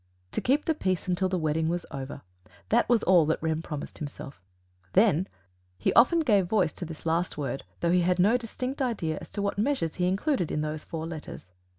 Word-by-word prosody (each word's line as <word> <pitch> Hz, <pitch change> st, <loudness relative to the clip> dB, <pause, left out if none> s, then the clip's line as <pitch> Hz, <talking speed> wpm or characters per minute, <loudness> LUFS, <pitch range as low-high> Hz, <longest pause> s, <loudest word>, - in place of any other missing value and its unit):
To -, -, -2 dB
keep 280 Hz, +4 st, +2 dB
the 320 Hz, -, +2 dB
peace 185 Hz, -, -1 dB
until 185 Hz, +1 st, +1 dB
the 185 Hz, -, 0 dB
wedding 160 Hz, 0 st, 0 dB
was 175 Hz, +1 st, -2 dB
over 140 Hz, -1 st, -6 dB, 0.5 s
that -, -, +3 dB
was 235 Hz, -3 st, +4 dB
all 175 Hz, -4 st, +5 dB
that 160 Hz, -, +2 dB
Rem 160 Hz, 0 st, -1 dB
promised 150 Hz, -3 st, -6 dB
himself; 140 Hz, -, -8 dB, 0.5 s
THEN! 190 Hz, -3 st, +4 dB, 0.5 s
He 95 Hz, -, +1 dB
often 290 Hz, +8 st, +6 dB
gave 205 Hz, -, +3 dB
voice 190 Hz, -6 st, +2 dB
to 175 Hz, -, -6 dB
this 160 Hz, -1 st, -9 dB
last 165 Hz, +1 st, 0 dB
word, 135 Hz, -2 st, -3 dB, 0.2 s
though 170 Hz, -, +2 dB
he 180 Hz, 0 st, +4 dB
had 180 Hz, +1 st, +2 dB
no 200 Hz, +6 st, +4 dB
distinct 250 Hz, +3 st, -3 dB
idea 185 Hz, -, -1 dB
as -, -, -10 dB
to 200 Hz, -, -3 dB
what 200 Hz, 0 st, -1 dB
measures 215 Hz, -, 0 dB
he 180 Hz, -1 st, +1 dB
included 195 Hz, -, 0 dB
in 150 Hz, -, -1 dB
those 155 Hz, 0 st, -3 dB
four 160 Hz, -1 st, -5 dB
letters. 160 Hz, -, -7 dB
175 Hz, 210 wpm, -28 LUFS, 155-210 Hz, 0.5 s, often